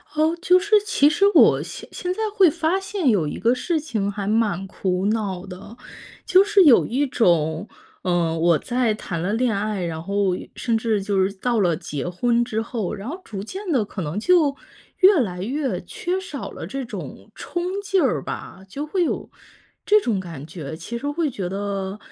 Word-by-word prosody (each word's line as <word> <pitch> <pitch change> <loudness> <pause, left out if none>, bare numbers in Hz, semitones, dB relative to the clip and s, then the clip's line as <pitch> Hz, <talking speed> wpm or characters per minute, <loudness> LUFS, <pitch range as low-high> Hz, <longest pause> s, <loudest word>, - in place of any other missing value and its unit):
哦， 315 +2 +2
就 365 0 +5
是 415 +3 +2
其 430 - +4
实 350 +6 +2
我 - - +6
现 - - -9
现 360 0 -3
在 - - -10 0.2
会 385 -5 +6
发 330 +3 0
现 385 -7 -1
有 180 -9 +2
一 - - -5
个 235 +2 +3
事 325 +5 -1
情 220 -10 -2
还 200 -1 -5
蛮 210 -4 +1
苦 185 -1 -2
恼 200 -4 -2
的。 195 +4 -11 0.5
就 375 +1 +6
是 405 -1 +5
有 265 -6 +7
一 275 +5 0
种， 170 - +1 0.3
呃， 175 -3 0
我 165 -1 +3
在 245 -2 0
谈 175 -5 -5
了 180 +4 -1
恋 230 -1 +1
爱， 200 -2 -2
然 160 -1 -4
后 200 0 0 0.2
甚 230 -2 0
至 220 -2 0
就 195 -1 +1
是 190 - 0
到 230 +4 -1
了 175 -4 +2
结 145 +1 -5
婚 235 +7 +1
之 220 -2 -2
后， 225 -4 -3
然 200 +3 -7
后 345 +7 -6
逐 200 -3 -6
渐 380 - -6
地 250 -8 +2
可 200 - -6
能 160 +4 -3
就 315 +1 +3 0.5
越 380 -3 +6
来 180 -6 -3
越 265 +7 -2
缺 360 +2 -3
少 340 -8 -7
了 - - -7
这 270 0 -4
种 240 - -8
冲 350 -1 -4 0.2
劲 390 -2 +1
儿 - - +1
吧。 190 - -7
就 280 +10 -5
会 350 +3 0
有 - - -3 0.6
这 425 +1 +5
种 225 - 0
感 165 -6 -8
觉， 155 -2 -7
其 235 +8 -6
实 285 +5 -3
会 305 +1 0
觉 200 -8 -4
得 195 0 -3
225 Hz, 210 characters per minute, -22 LUFS, 190-310 Hz, 0.6 s, 有